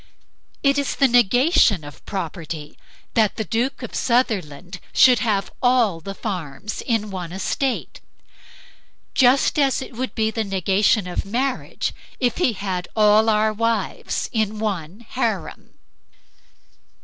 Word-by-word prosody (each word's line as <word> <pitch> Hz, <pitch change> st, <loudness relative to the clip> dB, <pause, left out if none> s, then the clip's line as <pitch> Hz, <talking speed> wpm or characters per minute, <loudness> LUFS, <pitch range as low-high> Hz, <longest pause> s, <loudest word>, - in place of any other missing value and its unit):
It 280 Hz, 0 st, +3 dB
is 280 Hz, -, -2 dB
the 275 Hz, -, +4 dB
negation 245 Hz, -, +4 dB
of 145 Hz, -1 st, -12 dB
property 165 Hz, -5 st, -5 dB, 0.4 s
that 220 Hz, -3 st, +2 dB
the 220 Hz, -, -2 dB
Duke 245 Hz, +5 st, -2 dB
of 240 Hz, -, -7 dB
Sutherland 185 Hz, -, -1 dB
should 250 Hz, -3 st, +6 dB
have 205 Hz, -3 st, 0 dB
all 245 Hz, -8 st, +3 dB
the 195 Hz, +4 st, -7 dB
farms 185 Hz, -2 st, -5 dB
in 215 Hz, -3 st, 0 dB
one 180 Hz, -3 st, -5 dB
estate; 250 Hz, +7 st, -2 dB, 1.1 s
just 265 Hz, +4 st, +4 dB
as 275 Hz, -2 st, +2 dB
it 260 Hz, -, -8 dB
would 255 Hz, +2 st, -4 dB
be 220 Hz, -1 st, +1 dB
the 220 Hz, 0 st, -1 dB
negation 195 Hz, +1 st, +2 dB
of 180 Hz, -, -3 dB
marriage 255 Hz, +6 st, -2 dB, 0.3 s
if 245 Hz, -3 st, 0 dB
he 280 Hz, -10 st, +2 dB
had 185 Hz, -3 st, -4 dB
all 215 Hz, +1 st, +5 dB
our 215 Hz, 0 st, +2 dB
wives 230 Hz, -2 st, -1 dB
in 215 Hz, -2 st, 0 dB
one 200 Hz, -2 st, -4 dB
harem. -, -, -3 dB
215 Hz, 130 wpm, -22 LUFS, 190-245 Hz, 1.1 s, should